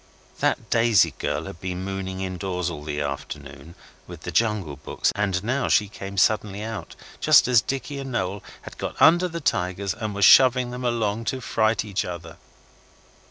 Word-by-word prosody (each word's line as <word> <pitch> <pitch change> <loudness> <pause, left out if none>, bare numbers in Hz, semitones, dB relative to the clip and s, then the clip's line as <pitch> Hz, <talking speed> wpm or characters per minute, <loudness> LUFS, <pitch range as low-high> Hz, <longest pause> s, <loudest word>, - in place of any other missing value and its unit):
That - - -1
Daisy 115 -4 +4
girl - - -2
had 85 - -9
been 90 0 -4
mooning 95 -1 -4
indoors 90 -1 -3
all 75 -3 -7
the 75 -1 -3
afternoon 70 +2 -7 0.3
with - - -10
the - - -5
Jungle 105 -10 0
Books, 70 - -1
and 95 -3 -1
now 130 +3 0
she 105 - +3
came 100 -1 -8
suddenly 105 0 +1
out, 110 -2 -6 0.2
just - - +6
as 125 -3 +5
Dicky 135 +3 -4
and 135 -1 -6
Noel 100 -4 -2 0.2
had - - -11
got - - -5
under 175 +3 +6
the 170 -1 -5
tigers 95 - -1
and 110 -3 -5
were 100 - -1
shoving 125 +3 +6
them 125 +1 -6
along 115 -2 -1
to 130 - -2
fright 110 -3 0
each 100 -1 -2
other. 85 -3 -8
100 Hz, 175 wpm, -24 LUFS, 90-115 Hz, 0.3 s, just